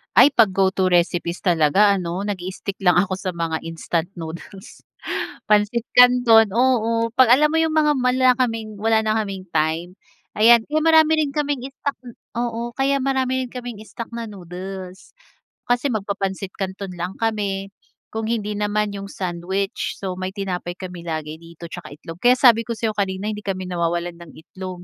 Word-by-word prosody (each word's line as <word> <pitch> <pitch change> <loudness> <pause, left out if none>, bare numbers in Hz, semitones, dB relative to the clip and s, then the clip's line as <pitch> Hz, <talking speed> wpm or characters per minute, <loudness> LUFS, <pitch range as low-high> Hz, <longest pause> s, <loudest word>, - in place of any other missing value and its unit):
Ay, 290 - +8
'pag 220 -5 +4
go-to 190 0 +2
recipes 175 -1 +1
talaga, 175 +3 +4
ano, 175 +2 -3
nag-stick 190 0 -5
lang 180 -2 +3
ako 185 +1 +1
sa 185 -2 -3
mga 165 -1 -2
instant 165 0 -2
noodles, 170 +3 -10 0.6
pansit 210 +2 +3
canton, 245 -4 +6
oo. 230 -2 +2
Pag 255 -2 +6
alam 300 +3 +3
mo 325 - +1
yung, 320 -1 +1
mga 305 -1 +4
wala 255 +1 +3
kaming 225 -3 -1
wala 220 +1 +3
na 215 0 +1
kaming 195 -3 -4
time, 160 +2 0 0.5
ayan 230 +2 +7
kaya 305 +1 +1
marami 320 -1 +5
rin 285 - -3
kaming 285 -3 -2
stock. 280 +1 -4 0.4
Oo, 235 0 -2
kaya 275 +1 +2
marami 260 -1 0
rin - - -11
kaming 245 -4 -7
stock 230 +1 -7
na 230 -1 -5
noodles. 185 0 -9 0.6
Kasi 245 +3 +1
magpapansit 195 -2 -3
canton 190 0 -5
lang 175 +2 -4
kami. 200 -3 -1 0.4
Kung 220 0 -3
hindi 210 -3 -2
naman, 210 0 0
yung 200 0 -6
sandwich. 185 +2 -3
So, 190 -2 -4
may 185 0 -4
tinapay 185 -3 -4
kami 180 -2 -7
lagi 155 -2 -4
dito, 170 0 -11
tsaka 175 +1 -9
itlog. 165 +3 -10
Kaya 245 +1 +6
sabi 230 -3 +6
ko - - -3
sa 225 0 0
'yo - - -3
kanina 195 +1 -1
hindi 210 0 -7
kami 185 -2 -3
nawawalan 170 0 -1
ng 170 - -12
itlog. 180 +2 -9
200 Hz, 170 wpm, -21 LUFS, 180-235 Hz, 0.6 s, Ay